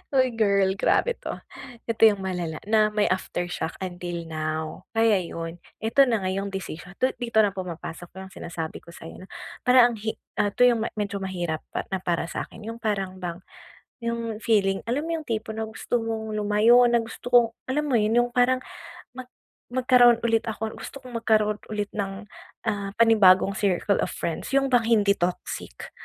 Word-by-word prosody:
Uy, 255 -2 +4
girl 200 -3 +3
grabe 485 - +2
'to. - - -5 0.5
Ito 230 - -2
yung 205 -2 +1
malala 175 -4 -3
na 215 -1 +4
may 210 -1 +2
aftershock 175 -3 -3
until 175 -2 -5
now, 155 0 -4
kaya 225 -3 +4
yun, 165 -1 -6 0.2
eto 265 +5 +4
na 225 -5 0
nga 185 - 0
yong 195 +1 -2
decision 180 -1 -7
'to 255 +5 +1
dito 235 -3 +3
na 205 - +2
pumapasok 175 -2 -7 0.2
yung 190 - -12
sinasabi 165 -1 -6
ko 170 - -15
sa'yo 165 - -10
na - - -13 0.4
parang 250 -1 +7
ang - - -5
hi 220 +1 -3 0.2
ah, - - +3
'to 245 - +3
yung 230 -2 +2
medyo 200 -1 -3
mahirap 175 -4 -3 0.2
pa - - -1
na 190 - -1
para 175 -2 -1
sa'kin, 210 - -6
yung 230 - -10
parang 195 -4 -2
bang 175 0 -5 0.6
yung 230 -2 -3
feeling, 195 -3 +2
alam 270 +7 -1
mo 335 - -1
yung 305 - -17
tipo 220 -1 -3
na 220 - -2
gusto 220 - -3
mong 220 -1 -3
lumayo 210 +4 +5
na, 235 - +4
gusto 230 +2 -7
kong 240 -1 +6 0.2
alam 300 +3 0
mo 265 - +1
yun 220 +1 +3
yung 245 - -6
parang 255 +1 +3 0.5
mag 255 0 -9 0.4
magkaroon 245 -1 +5
ulit 230 0 +1
ako 220 0 -4
gusto 275 - -9
kong 245 -2 -5
magkaroon 215 -2 +2
ulit 210 -1 -3
ng 195 -1 -3 0.5
ah, 200 -2 -4
panibagong 210 -5 +6
circle 200 0 +1
of - - -1
friends, 165 - -4
yung 275 0 +3
bang 245 -3 +3
hindi 215 -3 +3
toxic, 175 - -4
215 Hz, 180 wpm, -25 LUFS, 185-235 Hz, 0.6 s, parang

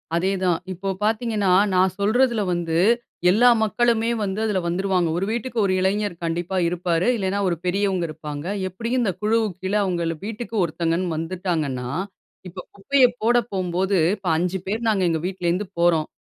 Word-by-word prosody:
அதேதான் 185 -1 +1
இப்போ 195 +2 -4
பாத்தீங்கன்னா, 215 -3 +1 0.2
நான் 185 0 +3
சொல்றதில 235 +2 +2
வந்து 165 -2 -1 0.5
எல்லா 240 +7 +5
மக்களுமே 230 +1 +1
வந்து, 195 +1 -2
அதில 205 -4 0
வந்துருவாங்க. 180 -1 0
ஒரு 185 - 0
வீட்டுக்கு 235 +1 -4
ஒரு 185 - +1
இளைஞர் 200 0 0
கண்டிப்பா 175 +3 -2
இருப்பாரு. 175 +1 0
இல்லைனா, 195 -1 -1
ஒரு 170 - 0
பெரியவங்க 190 -1 0
இருப்பாங்க, 150 -1 -7 0.2
எப்டியும் 230 +7 -2
இந்த 210 -5 +1
குழுவுக்கு 215 -3 0
கீழே 200 +3 +1
அவங்கள் 170 -3 -1
வீட்டுக்கு 225 +1 -6
ஒருத்தங்கன்னு 170 +1 -1
வந்துட்டாங்கன்னா, 160 -7 -2 0.6
இப்போ 180 +2 -10 0.2
குப்பைய 260 +7 +4 0.2
போட 240 +2 +3 0.2
போம்போது, 185 0 0 0.2
இப்போ 190 -4 -4
5 180 +2 -1
பேர் 225 +3 -2
நாங்க 200 -4 +1
எங்க 160 -1 0
வீட்லருந்து 185 +1 -2
போறோம். 170 -3 +3
190 Hz, 150 wpm, -23 LUFS, 175-210 Hz, 0.6 s, எல்லா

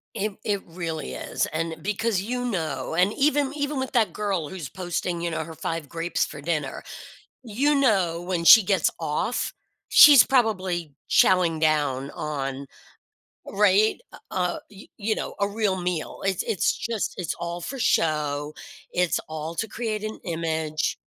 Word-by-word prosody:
It 210 +1 -2
it 205 -2 -1
really 165 - -5
is, - - -2
and 160 0 -3
because 210 +1 -1
you 245 +5 -3
know 160 - -3
and 180 +5 +3
even 285 -1 +1
even 290 -1 -2
with 260 - -4
that 230 -3 +3
girl 195 -8 -2
who's 180 -7 -6
posting, 175 +1 -3
you 170 0 -2
know, 160 -1 -3
her 160 0 -10
5 165 -1 -4
grapes 165 +3 -1
for 145 - -9
dinner, 150 -3 -3 0.6
you 260 +6 +1
know, 195 -11 +2
when 175 -1 -2
she 225 +6 +10
gets 190 -4 +2
off, 160 +9 -1 0.4
she's 285 -5 +9
probably 185 - 0 0.2
chowing 170 -4 +4
down 145 -4 +1
on 140 -2 -4 0.8
right, 205 +1 +3
uh - - -11 0.2
uh, 180 -1 -1
y 200 -1 -14
you 215 0 -1
know, - - -5
a 200 - +2
real 205 -2 0
meal. 175 -3 -3
It's 195 -2 0
it's 190 - 0
just 225 -2 -3
it's 175 -4 -2
all 170 0 -4
for 270 +9 -6
show, 150 -6 0 0.4
it's 180 -1 +1
all 160 +1 -5
to 220 +6 -2
create 220 -3 -3
an 215 0 -5
image. 160 -2 -2
180 Hz, 160 wpm, -25 LUFS, 160-215 Hz, 0.8 s, she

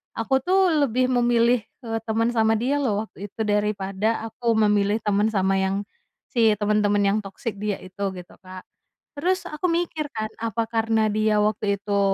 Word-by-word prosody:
aku 265 +4 +1
tuh 370 +4 +3 0.2
lebih 255 +2 +1
memilih, 240 -1 +3 0.2
eee, 225 -1 -2
teman 225 +2 +1
sama 225 -1 +2
dia 260 +6 0
loh 215 -6 0
waktu 205 -2 -9
itu 220 +3 -4
daripada 210 +1 -1
aku 230 0 0
memilih 210 0 +2
teman 210 0 +2
sama 195 -3 +1
yang 195 +1 0 0.5
si 225 -4 +4
temen-temen 205 0 +1
yang 200 +2 +2
toxic 200 +1 -6
dia 210 -1 -1
itu, 190 +2 -4
gitu, 180 -1 -11
Kak. 185 0 -11 0.5
Terus 370 +5 0
aku 305 +4 -2
mikir 330 -3 -1
kan, 220 -1 -2 0.2
apa 230 0 -1
karena 225 -1 +1
dia 215 0 +2
waktu 210 -1 0
itu 200 0 -1
220 Hz, 170 wpm, -24 LUFS, 205-235 Hz, 0.5 s, si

